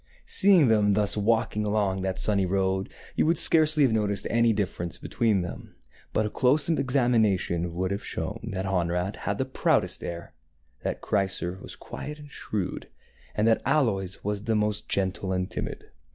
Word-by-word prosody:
Seeing 185 Hz, -7 st, +5 dB
them 105 Hz, -3 st, +3 dB
thus 105 Hz, -1 st, +1 dB
walking 110 Hz, 0 st, +1 dB
along 105 Hz, -2 st, 0 dB
that 95 Hz, -1 st, -2 dB
sunny 100 Hz, -3 st, +1 dB
road, 95 Hz, 0 st, 0 dB, 0.2 s
you -, -, +2 dB
would 165 Hz, 0 st, +3 dB
scarcely 155 Hz, -2 st, +5 dB
have 125 Hz, -5 st, +3 dB
noticed 105 Hz, -2 st, 0 dB
any 115 Hz, 0 st, +4 dB
difference 90 Hz, -5 st, -3 dB
between 110 Hz, -6 st, 0 dB
them; 90 Hz, -, -8 dB, 0.4 s
but 110 Hz, -, +1 dB
a -, -, -1 dB
close 135 Hz, +4 st, +3 dB
examination 115 Hz, -, +1 dB
would 95 Hz, +1 st, -1 dB
have 100 Hz, -, -3 dB
shown 110 Hz, +1 st, -5 dB
that 95 Hz, -1 st, -3 dB
Honorat 90 Hz, 0 st, -1 dB
had 100 Hz, +1 st, -3 dB
the 130 Hz, -, 0 dB
proudest 130 Hz, -, 0 dB
air, 85 Hz, 0 st, -6 dB, 0.5 s
that -, -, -3 dB
Chrysor 95 Hz, -2 st, -1 dB
was -, -, -8 dB
quiet 150 Hz, 0 st, -8 dB
and 145 Hz, -1 st, -13 dB
shrewd, 100 Hz, -8 st, -4 dB, 0.5 s
and 105 Hz, +1 st, +2 dB
that 115 Hz, -, +3 dB
Aloys 110 Hz, -10 st, 0 dB
was 105 Hz, +1 st, -3 dB
the 115 Hz, -, +1 dB
most 105 Hz, 0 st, -1 dB
gentle 95 Hz, 0 st, 0 dB
and 90 Hz, 0 st, -2 dB
timid. -, -, -6 dB
105 Hz, 165 wpm, -26 LUFS, 95-115 Hz, 0.5 s, Seeing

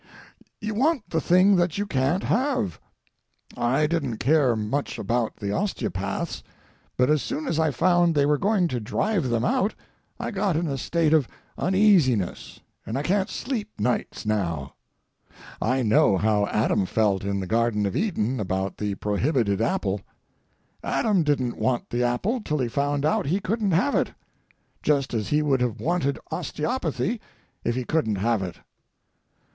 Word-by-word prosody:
You 215 Hz, +1 st, -3 dB
want 260 Hz, -, 0 dB
the 160 Hz, -, +1 dB
thing 185 Hz, +5 st, +5 dB
that 175 Hz, -1 st, +1 dB
you 205 Hz, -, 0 dB
can't 145 Hz, +1 st, 0 dB
have. 250 Hz, -6 st, 0 dB, 0.8 s
I 130 Hz, +6 st, +2 dB
didn't 145 Hz, -8 st, -1 dB
care 135 Hz, 0 st, +3 dB
much 110 Hz, +7 st, -2 dB
about 115 Hz, +2 st, -1 dB
the 100 Hz, -2 st, -4 dB
osteopaths, 100 Hz, -, -2 dB, 0.6 s
but 125 Hz, -, +4 dB
as 150 Hz, -2 st, +3 dB
soon 300 Hz, +3 st, -3 dB
as 160 Hz, -, 0 dB
I 160 Hz, -1 st, +3 dB
found 175 Hz, +4 st, +3 dB
they 145 Hz, -1 st, +4 dB
were 145 Hz, 0 st, +2 dB
going 200 Hz, -2 st, +2 dB
to 125 Hz, -, -2 dB
drive 150 Hz, -, -1 dB
them 115 Hz, 0 st, +1 dB
out 200 Hz, +8 st, +1 dB, 0.4 s
I -, -, -3 dB
got 195 Hz, -4 st, 0 dB
in 170 Hz, -, 0 dB
a 140 Hz, -4 st, -2 dB
state 160 Hz, +3 st, +1 dB
of 150 Hz, -6 st, +4 dB, 0.3 s
uneasiness, 180 Hz, -, +2 dB, 0.2 s
and 115 Hz, -, -4 dB
I 140 Hz, -, -2 dB
can't 190 Hz, +4 st, +1 dB
sleep 230 Hz, -5 st, -4 dB
nights 125 Hz, -2 st, -1 dB
now. 85 Hz, -10 st, -1 dB, 0.9 s
I 130 Hz, +3 st, +1 dB
know 105 Hz, -3 st, +4 dB
how 105 Hz, 0 st, +2 dB
Adam 105 Hz, -3 st, +1 dB
felt 100 Hz, -3 st, +1 dB
in 100 Hz, 0 st, -1 dB
the 95 Hz, -, -3 dB
Garden 110 Hz, 0 st, +1 dB
of 100 Hz, -, -2 dB
Eden 135 Hz, -, 0 dB
about 95 Hz, -1 st, -2 dB
the 105 Hz, -1 st, -2 dB
prohibited 105 Hz, 0 st, 0 dB
apple. 100 Hz, -3 st, 0 dB, 0.8 s
Adam 210 Hz, -5 st, +1 dB
didn't 135 Hz, -6 st, 0 dB
want 125 Hz, -2 st, -1 dB
the 120 Hz, -, 0 dB
apple 185 Hz, -, 0 dB
till 150 Hz, -7 st, -2 dB
he 130 Hz, -4 st, 0 dB
found 145 Hz, +3 st, 0 dB
out 155 Hz, -, +1 dB
he 180 Hz, +7 st, +1 dB
couldn't 205 Hz, +1 st, -1 dB
have 190 Hz, -, +2 dB
it, -, -, 0 dB, 0.7 s
just 140 Hz, -3 st, +1 dB
as 110 Hz, -4 st, -1 dB
he 150 Hz, +6 st, +2 dB
would 135 Hz, -4 st, +2 dB
have 120 Hz, -2 st, -1 dB
wanted 155 Hz, -4 st, 0 dB
osteopathy 215 Hz, -, -2 dB, 0.4 s
if 120 Hz, -, 0 dB
he 130 Hz, -, -1 dB
couldn't 150 Hz, -9 st, 0 dB
have 110 Hz, +2 st, +1 dB
it. 90 Hz, -2 st, -4 dB
140 Hz, 160 wpm, -25 LUFS, 110-180 Hz, 0.9 s, thing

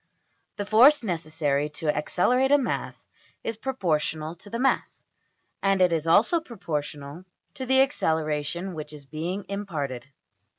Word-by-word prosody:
The 205 Hz, -, -4 dB
force 245 Hz, +7 st, +6 dB
necessary 155 Hz, -6 st, -1 dB
to 155 Hz, -3 st, 0 dB
accelerate 250 Hz, -, +2 dB
a 290 Hz, -, +7 dB
mass 265 Hz, -4 st, -3 dB, 0.4 s
is 225 Hz, -, -3 dB
proportional 165 Hz, -, -1 dB
to 205 Hz, -, -14 dB
the 230 Hz, -, -3 dB
mass, 265 Hz, +2 st, 0 dB, 0.6 s
and 195 Hz, -1 st, +2 dB
it 180 Hz, -2 st, +4 dB
is 165 Hz, -1 st, -1 dB
also 225 Hz, -, +4 dB
proportional 150 Hz, -, -5 dB, 0.3 s
to 260 Hz, -, -6 dB
the 265 Hz, +1 st, +5 dB
acceleration 160 Hz, -, 0 dB
which 155 Hz, -1 st, -7 dB
is 145 Hz, -2 st, -10 dB
being 170 Hz, +7 st, -4 dB
imparted. 150 Hz, -11 st, -4 dB
175 Hz, 135 wpm, -26 LUFS, 150-225 Hz, 0.6 s, a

